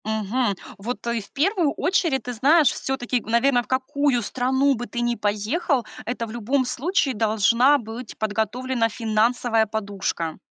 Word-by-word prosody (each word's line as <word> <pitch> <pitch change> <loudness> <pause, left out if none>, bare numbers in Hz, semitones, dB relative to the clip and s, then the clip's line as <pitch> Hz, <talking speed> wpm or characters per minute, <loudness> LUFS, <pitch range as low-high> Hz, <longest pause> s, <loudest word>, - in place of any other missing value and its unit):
Мгм. 220 +1 0 0.2
Вот, 235 +5 -5
э, 235 -1 0
в 200 - -16
первую 325 0 +1
очередь, 330 - +1
ты 245 - -5
знаешь, 285 +4 +4
все-таки, 255 -2 -2
наверно, 245 +4 +2
в - - -21
какую 260 0 +1
страну 265 +5 +1
бы 240 +1 -5
ты 240 - -4
ни 240 0 0
поехал, 230 - 0 0.2
это 235 -1 -3
в 220 - -9
любом 245 +4 0
случае 285 +2 0
должна 230 +5 +3
быть 230 -1 -8
подготовлена 225 +3 -1
финансовая 225 0 +1
подушка. 200 -6 -3
240 Hz, 150 wpm, -23 LUFS, 220-265 Hz, 0.2 s, знаешь